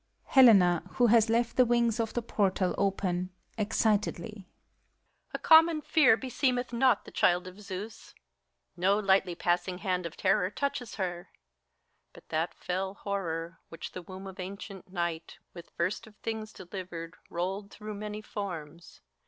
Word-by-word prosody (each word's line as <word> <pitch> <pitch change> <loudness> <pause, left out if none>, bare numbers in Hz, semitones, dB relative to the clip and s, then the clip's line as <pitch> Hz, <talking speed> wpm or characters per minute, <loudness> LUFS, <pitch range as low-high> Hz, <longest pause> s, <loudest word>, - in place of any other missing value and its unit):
HELENA 195 -10 +7
(who 245 -2 +4
hcLS 225 0 +5
left 235 +1 +1
the 255 - +7
wings 235 -1 +2
of 225 -1 -2
the 240 - -1
portal 195 -4 +1
open, 185 -2 0 0.3
excitedly), 210 -1 -1 0.8
A - - -3
common 320 0 +6
fear 295 -6 +4
beseemeth 250 -1 -1
not 240 -2 +3
the - - -11
child 175 +1 +2
of 185 +1 -10
Zieus; 205 +2 -8 0.6
No 190 +3 +2
lightly 190 -3 +2
passing 175 +1 0
hand 180 -3 -1
of 170 - -12
terror 190 -1 +2
touches 250 0 -3
her; 175 -3 -4 0.8
But - - -17
that 160 +2 -1
fell 190 +2 -3
Horror, 170 -5 -4
which 165 - -8
the 180 - -7
womb 185 +2 -10
of 190 0 -9
ancient 195 0 -8
Night 170 -3 -3 0.2
With 170 -1 -11
first 185 +6 -1
of 215 - -16
things 220 0 -5
delivered, 175 -3 -7 0.2
rolled 190 +4 -3
through 215 +1 -8
many 210 +1 -6
forms. 170 -6 -7
195 Hz, 145 wpm, -29 LUFS, 180-220 Hz, 0.8 s, HELENA